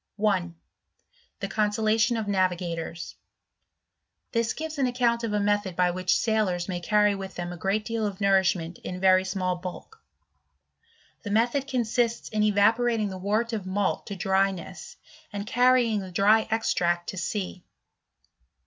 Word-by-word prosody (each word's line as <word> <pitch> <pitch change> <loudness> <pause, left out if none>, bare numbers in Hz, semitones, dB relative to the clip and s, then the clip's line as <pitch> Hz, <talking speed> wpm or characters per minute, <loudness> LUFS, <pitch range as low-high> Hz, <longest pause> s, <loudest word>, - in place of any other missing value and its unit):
1. 190 -5 0 0.9
The 195 - -2
Consolation 215 +3 +1
of 220 -2 -3
"Navigators. 175 -3 -2 1.2
This 230 -1 0
gives 315 -1 -6
an 265 - +3
account 240 -1 +1
of 230 - -2
a 210 - +1
method 205 -2 0
by 180 0 +2
which 185 0 +1
sailors 210 -6 0
may 180 -2 -3
carry 210 +3 +3
with 195 -1 -7
them 175 0 -4
a - - -8
great 195 +5 -1
deal 230 -2 -1
of 195 -2 -6
nourishment 190 -4 +1
in 180 - -6
very 185 0 +5
small 185 -1 -2
bulk* 185 - -9 1.2
The 205 - -6
method 240 +6 +1
consists 240 -2 -1
in 215 -1 -1
evaporating 215 +1 +2
the 190 -1 -7
wort 215 +5 -1
of 205 -4 -3
malt 195 +1 0
^ - - -36
to 200 - -5
dryness, 195 - -1 0.4
and 205 -1 -5
carrying 245 -2 +3
the 190 -1 -7
dry 205 +5 +3
extract 175 -6 0
to 190 - -6
sea. 180 0 -4
205 Hz, 150 wpm, -26 LUFS, 185-225 Hz, 1.2 s, very